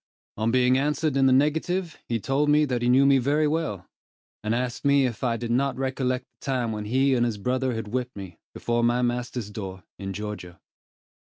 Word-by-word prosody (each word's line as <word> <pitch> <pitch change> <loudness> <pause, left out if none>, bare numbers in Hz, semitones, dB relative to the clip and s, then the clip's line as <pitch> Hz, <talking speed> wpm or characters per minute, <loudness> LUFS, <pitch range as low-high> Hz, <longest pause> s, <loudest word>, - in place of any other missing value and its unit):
On 110 +1 0
being 125 +1 +3
answered 150 +1 0
in 135 -1 +4
the - - +4
negative, 160 +6 +1
he 115 -1 0
told 140 +6 0
me 150 +1 +5
that 125 -4 -2
he 120 - +1
knew 130 +2 +5
me 140 -1 +5
very 145 +4 +2
well; 150 - -2 0.6
and 110 +2 0
asked 125 0 -3
me 140 -1 +4
if 120 -2 -4
I 120 -2 +1
did 115 0 -4
not 135 +3 +1
recollect 130 -1 -1
the - - -19
time 125 -4 0
when 105 -1 -4
he 135 +5 +2
and 120 -2 +2
his 115 -3 -1
brother 125 +3 -1
had 110 -2 -5
whipped 125 +2 -3
me, 95 -4 -9 0.2
before 120 0 0
my 120 +1 +2
master's 120 -2 -2
door, 95 -3 -7 0.2
in 95 -1 -4
Georgia. 95 -3 -6
125 Hz, 210 wpm, -25 LUFS, 115-135 Hz, 0.6 s, me